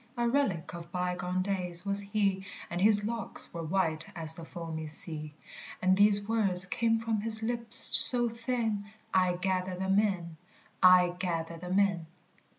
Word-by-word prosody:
A 240 0 -3
relic 235 - -4
of 170 0 -13
bygone 180 0 -5
days 180 -2 -5
was 200 0 -4
he, 200 -1 -4 0.3
And 175 +1 -6
his 205 0 +1
locks 230 +1 -5
were 170 - -8
white 165 -2 -4
as 160 -2 -5
the 165 - -10
foamy 160 -1 -10
sea; 155 -1 -9 0.4
And 185 0 -1
these 205 0 -1
words 195 -5 -2
came 225 +4 -3
from 225 -2 -5
his 220 0 -2
lips 235 0 +5 0.2
so 240 -1 +10
thin: 230 -3 -6 0.3
"I 185 -1 -1
gather 185 0 -5
them 190 +2 -2
in: 175 -6 -5 0.4
I 180 -1 +3
gather 170 -2 -6
them 180 +3 -6
in. 195 -5 -2
190 Hz, 155 wpm, -26 LUFS, 175-210 Hz, 0.4 s, so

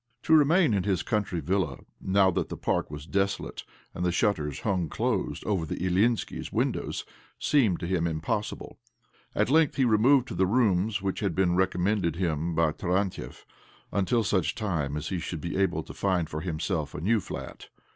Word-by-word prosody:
To 160 - +5
re 155 - +7
main 165 - +4
in 100 - +2
his 95 -2 0
country 100 -6 -1
villa, 80 -5 0 0.2
now 95 0 +3
that - - -2
the - - -5
park - - -1
was 75 0 -7
.desolate 100 +3 -2 0.3
and 90 - -4
the 90 - +2
shutters 80 -6 0
hung 90 -6 0
closed - - -2
over 100 -5 0
the 80 - -4
Ilyinskis' 95 +6 0
windows, - - -1 0.3
seemed 120 - +2
to - - -2
him 85 -1 0
impossible. 80 +6 -3 0.6
At - - +1
length 160 -1 +4
he 135 - +3
removed 125 +4 +4
to - - -5
the 95 - +2
rooms 105 -2 +2
which 95 -1 -1
had 100 -6 -1
been 90 -2 +2
recommended 95 -1 +1
him 85 -2 -1
by 80 -1 +3
Tarantiev, 90 +4 -2 0.5
until 100 +4 +1
such 95 -4 0
time 80 - -2
as 75 +1 -4
he 95 - -2
should 85 0 -5
be 85 +3 -4
able 95 0 +1
to - - -10
find 90 -5 0
for 75 - -3
himself 80 -3 -2
a - - -4
new 110 +8 +2
flat. 90 - -8
95 Hz, 185 wpm, -27 LUFS, 85-105 Hz, 0.6 s, re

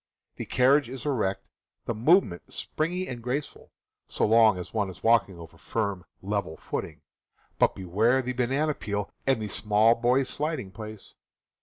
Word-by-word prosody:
The - - -5
carriage 135 +1 +3
is 130 +1 -7
erect, 100 -9 -1 0.4
the - - -1
movement 115 - +2
springy 180 +4 -2
and 120 -2 -6
graceful, 130 +5 -4 0.4
so - - 0
long 110 -2 +5
as 90 - -7
one 105 -3 0
is 95 - -12
walking 110 -5 +3
over 80 -1 -12
firm, 100 -5 -3 0.2
level 100 -5 -2
footing - - -5 0.3
— - - -39
but - - +3
beware 110 +8 +1
the 125 +1 -3
banana 135 +5 0
peel 105 -5 -4 0.2
and 135 -3 +3
the 110 - -3
small 105 +2 +3
boy's 125 +3 +2
sliding 145 -7 -2
place 110 0 -9
115 Hz, 160 wpm, -27 LUFS, 100-130 Hz, 0.4 s, long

